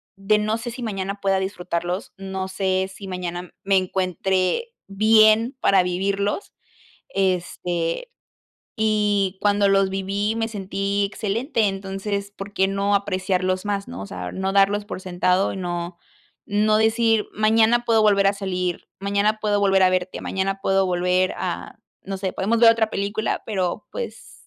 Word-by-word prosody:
de 200 +2 +2
no 215 +1 0
sé 235 +1 -5
si 250 +2 -8
mañana 200 -2 -3
pueda 195 -1 +2
disfrutarlos, 180 -1 -3
no 190 -1 -4
sé 190 0 -1
si 195 0 -9
mañana 180 -1 -5
me 195 0 +3
encuentre 185 - 0 0.2
bien 215 +4 +4
para 195 -2 +4
vivirlos, 195 - -1 0.6
este, 180 - -1 0.7
y 205 -3 +1
cuando 205 -1 +3
los 195 -1 +3
viví, 200 +3 -1
me 225 0 -1
sentí 200 -1 -2
excelente, 220 +3 -1
entonces, 195 +1 -4
¿por 200 +1 -8
qué 190 0 +2
no 200 +1 +1
apreciarlos 185 -1 0
más?, 200 -1 -2
¿no?, - - -7
o - - -5
sea, 90 -1 -6
no 190 0 -2
darlos 200 +1 +3
por 205 - -6
sentado 185 +1 +1
y - - -6
no 175 -1 -4 0.5
no 215 +1 +3
decir: 225 0 +2
"Mañana 225 +2 +3
puedo 225 -2 +4
volver 200 -2 +4
a 195 - +3
salir, 180 -3 -3
mañana 200 +2 +1
puedo 210 -1 +1
volver 195 -1 +4
a 185 - +6
verte, 185 0 -2
mañana 195 +1 -2
puedo 195 0 +2
volver 180 +1 +1
a - - -4 0.3
no 195 0 -5
sé, 190 -1 -3
podemos 220 +5 0
ver 230 -1 +8
otra 225 -1 +1
película, 205 +2 -2
pero 185 -5 -2
pues - - -7
195 Hz, 155 wpm, -23 LUFS, 185-210 Hz, 0.7 s, ver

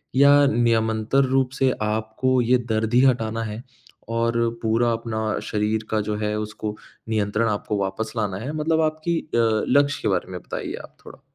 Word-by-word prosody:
या 140 +2 +7 0.2
नियमंतर 115 0 +2
रूप 130 0 +1
से 130 -1 +3
आपको 110 +4 0
ये 125 +2 +3
दर्द 110 +1 0
ही 125 - +6
हटाना 115 -3 +1
है? 110 +2 -6 0.5
और 115 0 0 0.2
पूरा 115 +1 +2
अपना 110 -2 -2
शरीर 110 +1 -1
का 110 - +1
जो 105 +1 -2
है, 105 0 -1
उसको 105 0 -5 0.3
नियंत्रण 105 +1 0
आपको 105 0 -2
वापस 100 +3 -3
लाना 100 -4 -1
है? 130 +8 -5
मतलब 160 +1 +1
आपकी 155 +2 0
अ, - - -13 0.4
लक्ष्य 145 +2 +3
के - - -1
बारे 95 -1 -1
में 90 - -5
बताइए - - -5
आप - - -15
थोड़ा। - - -13
115 Hz, 175 wpm, -23 LUFS, 110-130 Hz, 0.5 s, या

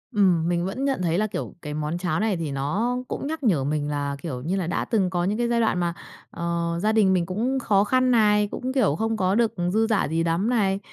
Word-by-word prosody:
Ừm, 180 -5 +3
mình 175 0 0
vẫn 255 +9 -3
nhận 270 -8 0
thấy 170 0 +1
là, 215 +1 +1
kiểu, - - -5
cái 150 -1 -6
món 155 +2 -2
cháo 175 -1 -1
này 210 -4 0
thì 160 -4 -3
nó 195 - -1
cũng 275 - -4
nhắc 315 -2 -4
nhở 170 - +2
mình 145 +1 -1
là, 145 -1 -2
kiểu 130 -7 -5
như 175 +7 -2
là, 185 -4 -2
đã 175 - -1
từng 200 -6 +1
có 175 -1 -1
những 205 +4 0
cái 240 0 0
giai 235 0 +1
đoạn 220 -5 +1
mà, 170 -1 0 0.4
ờ, 170 0 -2
gia 215 - +3
đình 205 -4 +4
mình 175 -2 +1
cũng 235 +9 -1
khó 200 -5 +2
khăn 255 +4 +2
này, 210 -2 +4
cũng, 255 +1 -4
kiểu, 215 - +2
không 225 +5 -1
có 190 -1 +1
được 230 -1 +2 0.2
dư 225 +1 +2
dả 215 -8 +1
gì 165 +2 0
lắm 170 +6 0
này, 200 -5 +1
190 Hz, 260 wpm, -24 LUFS, 170-225 Hz, 0.4 s, đình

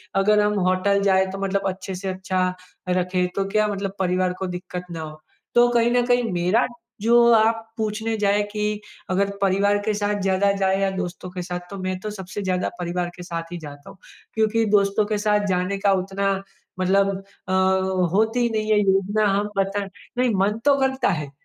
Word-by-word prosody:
अगर 210 +2 +4
हम 210 0 +1
होटल 200 +2 +2
जाएँ 190 -1 +4
तो 195 - -5
मतलब 195 0 0
अच्छे 190 0 -6
से 190 +1 -4
अच्छा 185 0 -1 0.4
रखें, 180 0 +1
तो 195 - 0
क्या 215 +1 +2
मतलब 195 -1 -3
परिवार 185 0 +1
को 190 - -2
दिक्कत 180 0 -6
ना 165 -1 -5
हो। 155 -1 -9 0.3
तो 240 0 +6
कहीं 235 0 +3
ना 245 0 +3
कहीं 245 0 +2
मेरा 180 +7 +2 0.3
जो 230 +3 +3 0.2
आप 225 0 +3
पूछने 220 +1 -2
जाएँ 205 0 +2
कि 210 0 -2 0.3
अगर 195 +2 +1
परिवार 200 +1 +3
के 215 - +1
साथ 205 0 -1
ज़्यादा 195 +1 +2
जाएँ 190 0 +2
या 195 - +2
दोस्तों 185 0 -5
के 180 - -5
साथ? 180 0 -4
तो 200 - -7
मैं 185 -1 -3
तो 215 - -5
सबसे 190 0 -6
ज़्यादा 185 -2 -1
परिवार 175 0 -2
के 180 - -9
साथ 165 -1 -5
ही - - -4
जाता 145 -2 -10
हूँ, - - -14 0.4
क्योंकि 220 +1 +2
दोस्तों 200 +1 +2
के 210 0 -1
साथ 210 0 +1
जाने 185 +2 0
का 195 0 +2
उतना 195 +1 0 0.5
मतलब 195 +2 +3 0.4
अ, 185 - -1 0.6
होती 220 +4 +2
ही 240 -1 +2
नहीं 215 -1 -1
है 210 - +5
योजना 200 +2 +2
हम 205 +1 -1
पता 195 +1 0 0.3
नहीं 250 0 +3
मन 200 +3 +1
तो 285 -1 +6
करता 265 -3 +1
है, 150 -7 -2
195 Hz, 195 wpm, -23 LUFS, 185-210 Hz, 0.6 s, तो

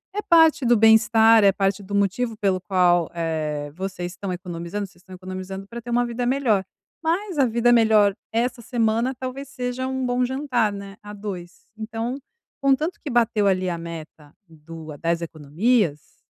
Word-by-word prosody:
é 420 - -1
parte 320 -6 +4
do 240 0 +5
bem-estar, 225 0 +6
é 200 - +6
parte 195 0 -1
do 200 +1 -9
motivo 205 +3 0
pelo 195 -3 0
qual, 175 -2 +2
eh, 155 -3 -3
vocês 180 -1 -5
estão 190 +2 -5
economizando, 180 +2 -5
vocês 175 -1 -23
estão 185 0 -14
economizando 185 +1 -7
pra 235 +3 -8
ter 240 - -10
uma 240 +1 +2
vida 240 +1 -3
melhor, 245 -6 +2 0.4
mas 350 +2 -1
a 275 - +4
vida 235 0 +2
melhor 220 -3 +5 0.2
essa 235 +2 -1
semana 230 +2 0
talvez 260 +2 -7
seja 250 -1 -4
um 260 0 -2
bom 245 0 +1
jantar, 250 -4 0
né, 200 -1 -8
a 205 - -9
dois, 195 -4 -8
então, 225 +3 -4 0.4
contanto 275 +5 +1
que 300 - -4
bateu 230 -4 +2
ali 185 -1 +1
a 170 - -3
meta 160 -3 -9
do 160 0 -11
a - - -11
das 170 +2 -1
economias, 165 - -1
210 Hz, 175 wpm, -23 LUFS, 180-245 Hz, 0.4 s, bem-estar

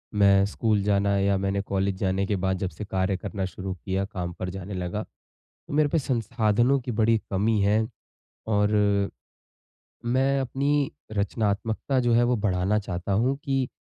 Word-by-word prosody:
मैं 100 -1 +5
स्कूल 105 0 0
जाना 100 0 +2
या 100 0 +2
मैंने 100 +1 0
कॉलेज 100 -1 -1
जाने 95 0 +1
के 100 - 0
बाद 95 0 +1
जब 95 -1 -2
से 105 - -8
कार्य 95 -1 0
करना 95 -1 -4
शुरू 95 0 -5
किया, 95 +1 -2
काम 90 -4 -5
पर 90 +2 -5
जाने 95 +1 -6
लगा। 90 +3 -3 0.5
तो - - -13
मेरे 150 0 +3
पे 165 - +2
संसाधनों 120 0 +1
की 125 0 -4
बड़ी 115 +1 +4
कमी 105 +3 +2
है 105 +2 +2 0.6
और 105 -1 +2 1.3
मैं 135 +3 +2
अपनी 140 +2 0 0.2
रचनात्मकता 110 +5 -1
जो 120 -1 +2
है 120 +1 +5
वो 120 0 +2
बढ़ाना 100 0 +1
चाहता 100 -2 -3
हूँ, 125 +7 +2
कि 135 -2 0
105 Hz, 165 wpm, -26 LUFS, 95-120 Hz, 1.3 s, मैं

